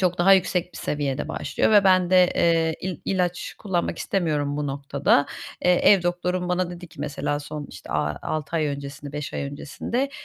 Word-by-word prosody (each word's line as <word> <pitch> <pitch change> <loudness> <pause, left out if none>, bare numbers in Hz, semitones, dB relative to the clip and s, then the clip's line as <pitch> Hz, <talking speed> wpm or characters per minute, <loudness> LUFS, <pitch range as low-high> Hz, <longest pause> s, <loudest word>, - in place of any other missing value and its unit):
çok 180 -1 +1
daha 190 +3 +6
yüksek 180 -1 +2
bir - - -9
seviyede 145 -3 -2
başlıyor - - 0
ve 205 -2 +6
ben 185 -2 +4
de, 185 -1 +6
eee, 165 -1 +2
il 185 -4 -4
ilaç 180 -2 -1
kullanmak 185 -5 -2
istemiyorum 150 -6 -1
bu 150 - -2
noktada. 140 +1 +1 0.4
Eee, 180 - +5
ev 190 +1 +5
doktorum 180 +1 -1
bana 180 0 0
dedi 175 0 -8
ki 140 - -13
mesela, 145 0 -2
son 150 0 -6
işte 95 - -11
a 75 -1 -1
6 155 +1 -2
ay 155 - +1
öncesini 140 0 -6
5 150 -1 -5
ay - - -2
öncesinde, 155 - -3
170 Hz, 185 wpm, -24 LUFS, 145-180 Hz, 0.4 s, daha